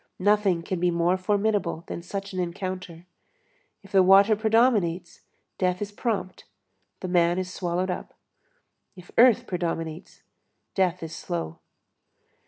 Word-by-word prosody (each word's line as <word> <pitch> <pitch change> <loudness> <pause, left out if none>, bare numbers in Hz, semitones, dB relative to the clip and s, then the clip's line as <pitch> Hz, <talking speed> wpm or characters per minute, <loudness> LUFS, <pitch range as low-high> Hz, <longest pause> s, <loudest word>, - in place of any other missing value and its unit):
Nothing 200 -3 +2
can 185 +1 -3
be 180 +1 +2
more 170 +1 +2
formidable 200 -3 0
than - - -6
such 195 +2 -6
an 185 - -3
encounter. 180 -1 -5 0.8
If 195 - -16
the 195 -2 +5
water 195 +3 +6
predominates, 210 -6 +1 0.4
death 180 -1 +1
is 205 0 -4
prompt, 205 -4 -3 0.6
the 185 - -4
man 175 -1 +2
is 185 -1 -3
swallowed 180 +1 -1
up; - - -7 0.8
if 180 -2 -14
earth 240 -2 +5
predominates, 165 -2 -4 0.5
death 185 -3 0
is 160 - -6
slow. 80 -1 -5
185 Hz, 130 wpm, -25 LUFS, 170-200 Hz, 0.8 s, water